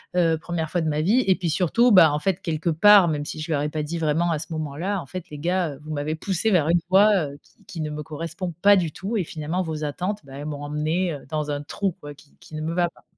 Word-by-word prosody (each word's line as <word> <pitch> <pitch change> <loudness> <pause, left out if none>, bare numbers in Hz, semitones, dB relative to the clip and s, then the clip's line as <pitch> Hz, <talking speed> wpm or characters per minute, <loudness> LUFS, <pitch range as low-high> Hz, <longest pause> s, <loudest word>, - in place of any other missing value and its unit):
Heu, 165 -2 +3
1re 165 -2 -3
fois 175 0 0
de 160 - 0
ma 150 0 0
vie 225 +10 +3
et 190 -1 +4
puis 170 -3 -2
surtout, 190 +10 +3
bah, 170 -7 +7
en 150 - -1
fait, 185 +2 -1
quelque 165 +1 -2
part, 195 +3 +7
même 150 -2 -2
si 155 - -6
je 160 +1 -5
leur 145 -2 +1
ai 150 - -1
pas 155 0 -3
dit 165 +3 -4
vraiment 165 +2 +1
à 160 - 0
ce 165 - -8
moment-là, 155 +6 -3
en - - -10
fait 180 +1 -7
les 150 - -7
gars, 175 +1 0
heu, 135 - -13
vous 155 - -8
m'avez 150 +2 -2
poussée 195 +5 -1
vers 165 -4 +3
une 175 +1 +4
voie, 200 +3 +6 0.2
heu, 140 - -11
qui - - -27
qui 165 -3 -7
ne 155 - -2
me 150 0 -5
correspond 165 +4 -5
pas 205 0 +7
du 175 -5 0
tout 200 +9 -5
et 185 - +1
finalement 160 +3 -3
vos 155 -2 -4
attentes, 180 +8 -3
bah, 135 - -13
elles 145 - -6
m'ont 145 -1 -5
emmenée, 155 +4 -1
heu, 145 - -9
dans 150 -1 -2
un 145 0 -3
trou 195 +6 -2
quoi, 145 -5 -10
qui 145 - -21
qui 155 - -12
ne 155 - -4
me 160 +2 -2
va 175 -1 +1
pas - - -24
160 Hz, 290 wpm, -24 LUFS, 150-185 Hz, 0.2 s, bah